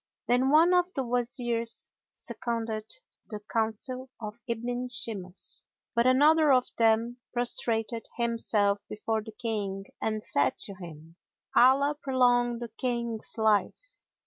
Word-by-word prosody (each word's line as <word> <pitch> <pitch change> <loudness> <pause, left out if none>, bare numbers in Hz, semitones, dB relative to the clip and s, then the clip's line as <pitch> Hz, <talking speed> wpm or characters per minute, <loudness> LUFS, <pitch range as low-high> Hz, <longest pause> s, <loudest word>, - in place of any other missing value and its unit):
Then 250 +2 +3
one 325 +5 +6
of 360 0 +3
the 270 - 0
Wazirs 240 -1 -1 0.3
seconded 225 -2 -4 0.4
the 210 -3 -5
counsel 230 +4 -2
of 215 +1 -7
Ibn 245 +2 -2
Shimas; 215 -6 -3 0.3
but 235 +1 +3
another 300 +4 +5
of 255 -1 +4
them 230 +1 +3
prostrated 230 -2 -1
himself 220 -4 +1
before 220 +1 -2
the 220 - -9
King 205 -4 -3 0.2
and 215 -1 -1
said 140 -2 +1
to 200 - -3
him, 165 -3 -11 0.4
"Allah 275 +4 +5
prolong 245 -2 +2
the 235 0 -6
King's 235 -3 -2
life! 220 - 0
235 Hz, 120 wpm, -28 LUFS, 220-250 Hz, 0.4 s, one